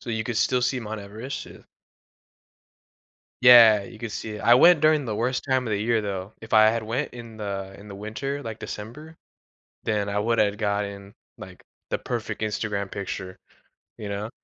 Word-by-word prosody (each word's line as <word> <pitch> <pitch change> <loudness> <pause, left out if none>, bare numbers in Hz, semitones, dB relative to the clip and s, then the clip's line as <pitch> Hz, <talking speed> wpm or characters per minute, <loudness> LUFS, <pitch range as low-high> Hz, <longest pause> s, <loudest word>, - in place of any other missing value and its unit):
so, 120 - -7
you 110 -1 -2
could 120 0 -3
still 125 +2 +2
see 125 +1 0
Mount 110 -1 -6
Everest, 110 +7 -7
yeah. - - -13 1.8
Yeah, 115 -4 +8
you 115 +1 -12
could 115 -2 -5
see 110 - -5
it. 105 - -8
I 120 - +6
went 170 +6 +7
during 155 -2 +3
the 110 -3 -3
worst 125 +4 -1
time 130 -3 0
of - - -3
the 105 - +1
year 115 0 +1
though. 100 0 -5
If 110 0 -8
I 110 0 +7
had 115 0 -2
went 120 +7 -3
in 115 -2 -10
the, 100 -2 -5
in 105 - -13
the 100 - -9
winter, 130 +8 -5
like, 115 -4 -7
December, 150 +10 -8 0.7
then 105 -2 0
I 100 0 -1
would 115 +2 0
have 105 -1 +2
gotten, 100 -2 -3 0.2
like, - - -11 0.3
the - - 0
perfect 110 -3 -4
Instagram 105 -2 -2
picture, 95 -2 -6 0.6
you 105 - -6
know. 100 +2 -4
110 Hz, 190 wpm, -25 LUFS, 100-120 Hz, 1.8 s, Yeah